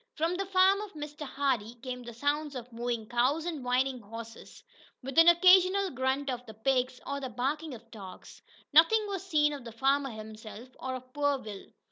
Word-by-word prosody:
From 330 Hz, +3 st, 0 dB
the 390 Hz, +1 st, -3 dB
farm 385 Hz, +1 st, +4 dB
of 420 Hz, -2 st, -8 dB
Mr. 295 Hz, -1 st, -7 dB
Hardee 255 Hz, -5 st, -1 dB
came 250 Hz, +1 st, -6 dB
the 240 Hz, -1 st, -8 dB
sounds 290 Hz, +3 st, -1 dB
of 245 Hz, -1 st, -8 dB
mooing 235 Hz, -1 st, -3 dB
cows, 255 Hz, +7 st, +1 dB
and 320 Hz, -6 st, -4 dB
whinnying 255 Hz, +1 st, +1 dB
horses, 225 Hz, +2 st, -10 dB, 0.4 s
with 270 Hz, +1 st, -6 dB
an 330 Hz, -, +7 dB
occasional 370 Hz, +2 st, +6 dB
grunt 265 Hz, +2 st, -1 dB
of 245 Hz, -1 st, -5 dB
the 220 Hz, -, -10 dB
pigs, 255 Hz, +2 st, 0 dB
or 280 Hz, 0 st, -3 dB
the 265 Hz, -2 st, -5 dB
barking 275 Hz, +5 st, -3 dB
of 230 Hz, 0 st, -16 dB
dogs. 195 Hz, -5 st, -11 dB, 0.3 s
Nothing 380 Hz, +8 st, +6 dB
was 390 Hz, -2 st, -4 dB
seen 300 Hz, -5 st, +2 dB
of 280 Hz, -3 st, -7 dB
the 230 Hz, -, -8 dB
farmer 270 Hz, +4 st, +1 dB
himself, 220 Hz, +1 st, -10 dB
or 260 Hz, 0 st, -4 dB
of 255 Hz, 0 st, -10 dB
poor 285 Hz, -1 st, +1 dB
Will. 210 Hz, -6 st, -9 dB
265 Hz, 190 wpm, -30 LUFS, 240-310 Hz, 0.4 s, an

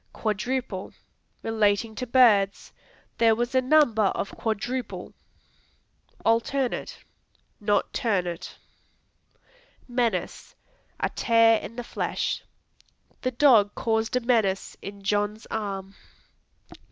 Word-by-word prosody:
Quadruple 220 Hz, -1 st, -3 dB, 0.5 s
Relating 220 Hz, 0 st, +1 dB
to 250 Hz, +4 st, -5 dB
birds; 220 Hz, -6 st, +3 dB, 0.5 s
"There 225 Hz, -1 st, +5 dB
was 240 Hz, +3 st, -2 dB
a 260 Hz, -, +4 dB
number 255 Hz, -6 st, +4 dB
of 195 Hz, -, -1 dB
quadruple." 240 Hz, +4 st, -3 dB, 1.1 s
Alternate 240 Hz, +3 st, 0 dB, 0.6 s
Not 205 Hz, 0 st, 0 dB
ternate. 180 Hz, -6 st, -2 dB, 1.3 s
Menace 240 Hz, -2 st, -2 dB, 0.4 s
A -, -, 0 dB
tare 230 Hz, -1 st, +4 dB
in 230 Hz, -, -9 dB
the 245 Hz, -, -5 dB
flesh; -, -, -2 dB, 0.8 s
"The 255 Hz, -, 0 dB
dog 235 Hz, -6 st, +4 dB
caused 220 Hz, 0 st, 0 dB
a 250 Hz, -, +2 dB
menace 220 Hz, -6 st, +1 dB
in 200 Hz, 0 st, -9 dB
John's 205 Hz, +2 st, -1 dB
arm." 195 Hz, -3 st, -4 dB
225 Hz, 95 wpm, -26 LUFS, 205-245 Hz, 1.3 s, There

